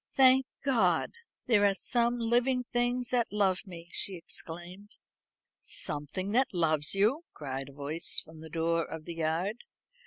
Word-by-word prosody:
"Thank 265 Hz, -1 st, +6 dB, 0.2 s
God! 260 Hz, -4 st, +2 dB, 0.3 s
there 220 Hz, -4 st, +4 dB
are 200 Hz, -1 st, +4 dB
some 240 Hz, +4 st, +1 dB
living 245 Hz, +2 st, +2 dB
things 245 Hz, 0 st, 0 dB
that 245 Hz, -2 st, +1 dB
love 200 Hz, -2 st, +1 dB
me," 170 Hz, -2 st, -10 dB
she 195 Hz, -, 0 dB
exclaimed. 175 Hz, +4 st, -8 dB, 0.7 s
"Something 150 Hz, +7 st, -2 dB
that 260 Hz, -1 st, +2 dB
loves 155 Hz, -1 st, +1 dB
you!" 225 Hz, -, +2 dB
cried 135 Hz, -2 st, -5 dB
a -, -, -13 dB
voice 145 Hz, +4 st, 0 dB
from 160 Hz, 0 st, -13 dB
the 160 Hz, 0 st, -9 dB
door 165 Hz, +1 st, +1 dB
of 160 Hz, 0 st, -8 dB
the 170 Hz, -, -5 dB
yard. 165 Hz, +6 st, -1 dB
190 Hz, 150 wpm, -30 LUFS, 160-240 Hz, 0.7 s, Thank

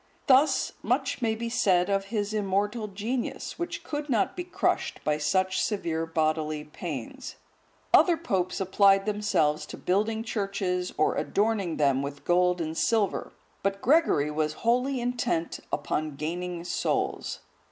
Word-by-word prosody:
Thus 275 Hz, +2 st, +4 dB
much -, -, 0 dB
may 220 Hz, -2 st, +1 dB
be 230 Hz, +1 st, -4 dB
said 190 Hz, -7 st, +2 dB
of 195 Hz, -1 st, 0 dB
his 210 Hz, 0 st, -2 dB
immortal 205 Hz, +2 st, 0 dB
genius, 220 Hz, +5 st, -4 dB
which 345 Hz, 0 st, -4 dB
could 295 Hz, 0 st, -4 dB
not 230 Hz, -6 st, +1 dB
be 355 Hz, -, -3 dB
crushed 360 Hz, -, -1 dB
by 150 Hz, 0 st, 0 dB
such 185 Hz, +5 st, +1 dB
severe 165 Hz, -6 st, -1 dB
bodily 155 Hz, -1 st, 0 dB
pains. 150 Hz, -5 st, -7 dB, 0.6 s
Other 345 Hz, -2 st, +6 dB
popes 190 Hz, -, -1 dB
applied 195 Hz, +1 st, +4 dB
themselves 205 Hz, -8 st, +1 dB
to -, -, -8 dB
building 215 Hz, +4 st, 0 dB
churches 195 Hz, -4 st, -2 dB
or 155 Hz, -, +3 dB
adorning 200 Hz, -5 st, 0 dB
them 140 Hz, -3 st, +3 dB
with 140 Hz, 0 st, -6 dB
gold 180 Hz, 0 st, +3 dB
and 160 Hz, -1 st, -3 dB
silver, 210 Hz, +2 st, +1 dB, 0.3 s
but 195 Hz, 0 st, -1 dB
Gregory 245 Hz, -, +3 dB
was 155 Hz, 0 st, -1 dB
wholly 250 Hz, +3 st, +2 dB
intent 240 Hz, -8 st, -1 dB
upon 155 Hz, -1 st, -2 dB
gaining 170 Hz, +3 st, -4 dB
souls. 175 Hz, -, -2 dB
195 Hz, 140 wpm, -27 LUFS, 165-225 Hz, 0.6 s, Other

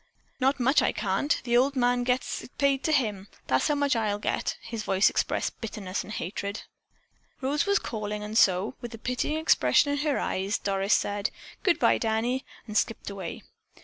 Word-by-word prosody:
"Not 270 Hz, +1 st, +2 dB
much 265 Hz, +4 st, +4 dB
I -, -, +1 dB
can't! 295 Hz, +3 st, 0 dB
The 240 Hz, -1 st, +1 dB
old 270 Hz, +3 st, +3 dB
man 245 Hz, -1 st, +2 dB
gets 250 Hz, +1 st, -1 dB
it -, -, -14 dB
paid 280 Hz, -1 st, +2 dB
to 315 Hz, -, +2 dB
him. 210 Hz, -9 st, 0 dB, 0.2 s
That's 130 Hz, 0 st, +2 dB
how 295 Hz, -, +2 dB
much 285 Hz, -2 st, +2 dB
I'll 215 Hz, -3 st, 0 dB
get 205 Hz, -, -1 dB
it." -, -, -17 dB
His 230 Hz, -1 st, -5 dB
voice 195 Hz, -2 st, +3 dB
expressed -, -, -1 dB
bitterness 205 Hz, -4 st, -4 dB
and -, -, -10 dB
hatred. 200 Hz, +2 st, -4 dB, 0.8 s
Rose 285 Hz, +6 st, 0 dB
was 400 Hz, 0 st, +4 dB
calling 210 Hz, -2 st, -4 dB
and 210 Hz, +1 st, -6 dB
so, 190 Hz, +1 st, +4 dB
with 240 Hz, -2 st, -6 dB
a -, -, -10 dB
pitying 250 Hz, +6 st, -1 dB
expression 315 Hz, -2 st, +3 dB
in 285 Hz, -, 0 dB
her 295 Hz, -1 st, +1 dB
eyes, 195 Hz, +2 st, -1 dB
Doris 195 Hz, 0 st, +1 dB
said, 205 Hz, +1 st, -1 dB, 0.3 s
"Good 370 Hz, -7 st, +3 dB
bye, -, -, +3 dB
Danny," 230 Hz, +4 st, 0 dB, 0.2 s
and 215 Hz, -, -8 dB
skipped 215 Hz, -1 st, 0 dB
away. 190 Hz, -4 st, -6 dB
230 Hz, 190 wpm, -27 LUFS, 205-270 Hz, 0.8 s, much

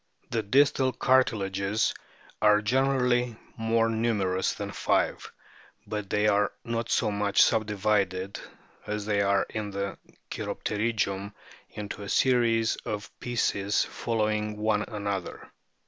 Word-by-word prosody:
The 115 Hz, -2 st, +1 dB
distal 130 Hz, +4 st, +3 dB
cartilages 105 Hz, -5 st, +1 dB, 0.5 s
are 105 Hz, -1 st, +6 dB
generally 125 Hz, 0 st, +2 dB, 0.2 s
more 115 Hz, 0 st, +1 dB
numerous 105 Hz, -5 st, 0 dB
than -, -, -5 dB
five; -, -, 0 dB, 0.5 s
but 105 Hz, -2 st, -4 dB
they 105 Hz, +1 st, +2 dB
are 105 Hz, -1 st, +3 dB
not 115 Hz, -1 st, -3 dB
so 110 Hz, -3 st, +2 dB
much 100 Hz, -1 st, +3 dB
subdivided 100 Hz, -3 st, 0 dB, 0.5 s
as 105 Hz, -1 st, -3 dB
they 105 Hz, -1 st, +1 dB
are 100 Hz, 0 st, +2 dB
in 105 Hz, -1 st, -3 dB
the 100 Hz, 0 st, -4 dB, 0.3 s
cheirop -, -, -5 dB
terygium 105 Hz, -2 st, -1 dB, 0.4 s
into 105 Hz, 0 st, -7 dB
a 100 Hz, -, -6 dB
series 115 Hz, -3 st, +3 dB
of 105 Hz, -1 st, -5 dB
pieces 105 Hz, -4 st, 0 dB
following 105 Hz, -2 st, -1 dB
one 105 Hz, 0 st, +1 dB
another. 100 Hz, -4 st, -4 dB
105 Hz, 115 wpm, -27 LUFS, 100-115 Hz, 0.5 s, are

